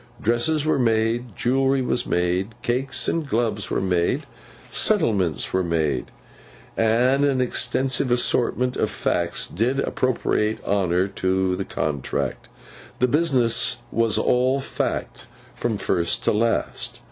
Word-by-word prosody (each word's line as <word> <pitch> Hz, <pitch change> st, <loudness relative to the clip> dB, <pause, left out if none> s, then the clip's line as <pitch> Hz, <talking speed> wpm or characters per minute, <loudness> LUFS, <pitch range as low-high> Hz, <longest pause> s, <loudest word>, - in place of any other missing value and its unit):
Dresses 120 Hz, +7 st, +1 dB
were 155 Hz, -, +1 dB
made, 115 Hz, -1 st, 0 dB
jewellery 135 Hz, +1 st, +1 dB
was 125 Hz, -1 st, -1 dB
made, 90 Hz, +5 st, -1 dB
cakes 130 Hz, +2 st, 0 dB
and 160 Hz, -4 st, -1 dB
gloves 110 Hz, -4 st, -1 dB
were -, -, 0 dB
made, 90 Hz, -2 st, 0 dB, 0.5 s
settlements 105 Hz, -, +1 dB
were 95 Hz, -, +2 dB
made, 80 Hz, -6 st, -1 dB, 0.7 s
and 125 Hz, +5 st, +2 dB
an 140 Hz, -2 st, +2 dB
extensive 130 Hz, +1 st, 0 dB
assortment 125 Hz, +1 st, +1 dB
of -, -, 0 dB
Facts 85 Hz, -1 st, 0 dB
did 125 Hz, +8 st, -1 dB
appropriate 115 Hz, -5 st, 0 dB
honour 95 Hz, -2 st, +1 dB
to 95 Hz, -1 st, 0 dB
the 95 Hz, +1 st, -4 dB
contract. 75 Hz, -2 st, -3 dB, 0.5 s
The 125 Hz, -, +2 dB
business 125 Hz, -5 st, +2 dB
was 115 Hz, -2 st, +2 dB
all 130 Hz, +2 st, +2 dB
Fact, 135 Hz, -, -4 dB, 0.3 s
from 115 Hz, -3 st, -2 dB
first 85 Hz, -3 st, -1 dB
to -, -, +2 dB
last. 115 Hz, +2 st, -1 dB
115 Hz, 125 wpm, -23 LUFS, 95-130 Hz, 0.7 s, were